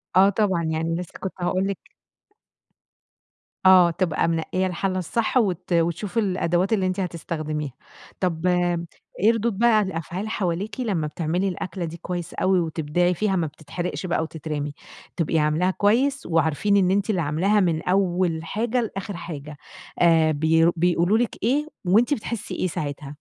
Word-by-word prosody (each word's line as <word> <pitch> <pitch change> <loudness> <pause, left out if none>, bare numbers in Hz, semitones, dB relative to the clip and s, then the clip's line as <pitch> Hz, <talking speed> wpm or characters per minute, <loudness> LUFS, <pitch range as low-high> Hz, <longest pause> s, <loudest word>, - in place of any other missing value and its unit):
آه 190 +2 +7
طبعًا، 195 -4 +1
يعني 160 +1 -1
لسه 175 0 -7
كنت 190 - -4
هاقول 185 +2 0
لِك 200 -2 -2 1.9
آه، 185 -2 +7
تبقى 165 -2 0
منقية 170 +3 0
الحلة 185 +1 -1
الصح 220 +8 0
وت 185 -6 0
وتشوف 170 +6 0
الأدوات 185 -1 +1
اللي 195 -3 +1
أنتِ 185 +1 -2
هتستخدميها. 155 -4 -3 0.5
طب 175 -2 -1 0.7
إيه 215 +5 +5
ردود 230 -2 -1
بقى 225 -1 +4
الأفعال 190 +2 -4
حواليكِ 200 +2 -2
لما 195 -11 -1
بتعملي 170 +5 -1
الأكلة 180 -1 -4
دي 165 +1 -7
كويس 175 -1 -5
أوي 185 -1 +2
وتبدعي 165 +2 0
فيها، 195 +2 0
ما 170 -3 0
بتتحرقش 155 +5 -5
بقى 170 -2 0
وتترمي، 150 -2 -4 0.4
تبقي 165 -1 +1
عاملاها 155 +5 +2
كويس، 250 +9 +1
وعارفين 165 +5 +2
إن 185 -2 +3
أنتِ 200 +2 +1
اللي 185 -5 +1
عاملاها 175 +8 +2
من 165 -4 +1
أول 180 -3 +1
حاجة 235 +7 -1
لآخر 200 -2 -5
حاجة، 150 -3 -7 0.4
آآ 165 -2 +5
ب 160 +2 +3
بيقولوا 175 +4 +2
لِك 235 -3 0
ايه؟ 280 +7 +1 0.2
وأنتِ 225 +10 +4
بتحسي 230 -3 -4
إيه - - 0
ساعتها؟ 145 -3 -5
180 Hz, 150 wpm, -24 LUFS, 165-200 Hz, 1.9 s, آه